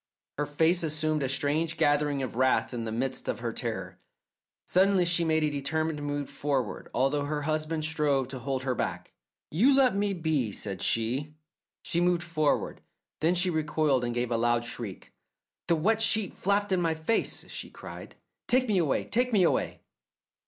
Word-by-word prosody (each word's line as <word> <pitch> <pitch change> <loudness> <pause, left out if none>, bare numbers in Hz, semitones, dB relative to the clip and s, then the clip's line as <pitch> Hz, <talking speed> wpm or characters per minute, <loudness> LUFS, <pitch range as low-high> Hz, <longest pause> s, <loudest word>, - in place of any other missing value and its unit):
Her 145 - 0
face 160 +4 +2
assumed 155 -1 0
a 135 - 0
strange 155 +4 0
gathering 145 -2 +2
of 125 - -5
wrath 130 +1 +2
in 115 -2 -3
the 110 - -3
midst 130 +3 -2
of - - -1
her - - -3
terror. - - -4 0.7
Suddenly 190 0 +3
she 170 0 +2
made 160 -1 +2
a 150 - +1
determined 150 +2 -2
move 145 -1 -3
forward, 135 -4 -2
although 135 +3 +1
her 150 0 -2
husband 155 +1 -1
strove 150 -4 +1
to 130 -1 -6
hold 130 +1 -3
her 130 -1 0
back. - - -4 0.4
"You 245 - +4
let 260 -5 +4
me 200 0 +1
be," 160 - 0
said 95 -2 -5
she. 130 +7 0 0.5
She 170 - 0
moved 175 0 +2
forward. 155 -4 0 0.4
Then 165 +3 +2
she 180 +1 +2
recoiled 150 -4 +1
and 120 - -1
gave 120 0 -1
a 115 - +2
loud 120 0 +1
shriek. 115 -5 -7 0.5
"The 170 - +3
wet 215 +8 +1
sheet 220 -3 +2
flapped 200 +1 0
in 185 -1 +2
my 165 -2 +1
face," 160 +8 -1
she - - -6
cried. - - -10 0.3
"Take 255 +1 +3
me 205 -4 +2
away, 155 -5 +1
take 250 +2 +1
me 205 -5 +4
away!" 170 - 0
155 Hz, 180 wpm, -28 LUFS, 135-175 Hz, 0.7 s, You